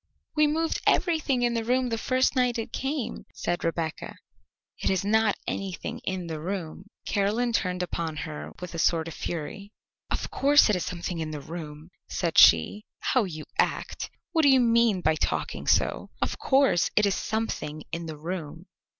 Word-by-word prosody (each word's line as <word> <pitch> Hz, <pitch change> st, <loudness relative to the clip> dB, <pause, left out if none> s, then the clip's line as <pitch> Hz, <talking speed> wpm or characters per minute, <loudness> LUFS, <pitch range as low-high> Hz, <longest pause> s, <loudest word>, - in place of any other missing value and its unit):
"We 305 Hz, 0 st, +5 dB
moved 320 Hz, +2 st, 0 dB
everything 300 Hz, -8 st, +2 dB
in 240 Hz, -1 st, +2 dB
the 230 Hz, -1 st, -1 dB
room 250 Hz, +2 st, +1 dB
the 225 Hz, -, -1 dB
first 255 Hz, +3 st, +1 dB
night 250 Hz, -2 st, +2 dB
it 225 Hz, -, -5 dB
came," 270 Hz, -3 st, -3 dB
said 175 Hz, 0 st, -2 dB
Rebecca; 165 Hz, -1 st, -3 dB, 0.6 s
"it -, -, 0 dB
is 190 Hz, 0 st, 0 dB
not 220 Hz, 0 st, +3 dB
anything 190 Hz, -3 st, -4 dB
in 185 Hz, -2 st, -3 dB
the 160 Hz, -2 st, -5 dB
room." 180 Hz, +1 st, -5 dB, 0.2 s
Caroline 220 Hz, +4 st, +1 dB
turned 180 Hz, -4 st, 0 dB
upon 165 Hz, -2 st, -3 dB
her 75 Hz, 0 st, -7 dB
with 180 Hz, -1 st, -7 dB
a 170 Hz, -, -4 dB
sort 165 Hz, 0 st, +2 dB
of 165 Hz, -, -6 dB
fury. 175 Hz, +7 st, -5 dB, 0.4 s
"Of -, -, -3 dB
course 285 Hz, -5 st, +5 dB
it -, -, +2 dB
is 180 Hz, -, -2 dB
something 175 Hz, -1 st, -4 dB
in 160 Hz, -1 st, -3 dB
the 150 Hz, -1 st, -5 dB
room," 155 Hz, +1 st, -8 dB, 0.2 s
said 170 Hz, -3 st, +1 dB
she. 85 Hz, -, +6 dB, 0.3 s
"How 255 Hz, -5 st, +4 dB
you 155 Hz, -4 st, -7 dB
act! -, -, 0 dB, 0.2 s
What 330 Hz, -2 st, +3 dB
do 285 Hz, -, +5 dB
you 265 Hz, -1 st, +6 dB
mean 230 Hz, -5 st, +3 dB
by 160 Hz, -, +3 dB
talking 155 Hz, -, -2 dB
so? -, -, +2 dB
Of -, -, -2 dB
course 270 Hz, -9 st, +3 dB
it 210 Hz, -, +5 dB
is 200 Hz, -, +2 dB
something 180 Hz, -10 st, -3 dB
in 170 Hz, 0 st, -4 dB
the 155 Hz, -1 st, -6 dB
room." 160 Hz, -1 st, -6 dB
190 Hz, 180 wpm, -27 LUFS, 165-240 Hz, 0.6 s, she